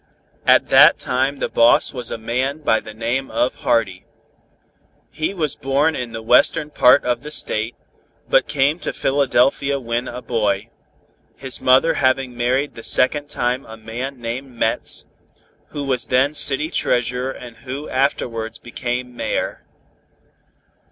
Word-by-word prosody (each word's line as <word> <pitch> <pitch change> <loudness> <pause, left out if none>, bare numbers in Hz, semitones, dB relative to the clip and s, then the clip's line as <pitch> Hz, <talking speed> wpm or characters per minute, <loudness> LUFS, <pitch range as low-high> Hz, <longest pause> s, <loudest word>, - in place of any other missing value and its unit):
At - - +5
that - - +7
time 130 +2 -1
the - - -2
boss 115 +1 +4
was 125 -3 -4
a - - -4
man 130 +6 -2
by 110 -6 +2
the 110 - -11
name 120 +4 -2
of 125 - -1
Hardy. 110 -7 0 1.1
He 155 - -2
was 160 -7 -2
born 140 +4 0
in 125 -2 -5
the 110 -1 -7
western 135 +6 +3
part 125 0 +5
of 120 -1 -1
the 150 - -8
State, 110 -5 -2 0.5
but - - +3
came 145 +4 +1
to - - -4
Philadelphia 140 0 +1
when 120 0 -3
a 125 +1 -7
boy, 105 -2 -1 0.6
his 130 -1 -4
mother 130 +6 +4
having 130 -3 0
married 130 +4 0
the 115 - -10
second 145 +3 +1
time 125 -1 -1
a 110 0 -10
man 120 +5 -6
named 120 +4 -5
Metz, 115 -1 0 0.6
who 145 - -6
was 130 -3 0
then 130 +3 +2
City 150 +2 +4
Treasurer 125 -1 0
and 120 -3 -9
who 135 +5 -7
afterwards 115 -4 -2
became 125 0 -5
Mayor. - - -3
125 Hz, 145 wpm, -20 LUFS, 120-140 Hz, 1.1 s, that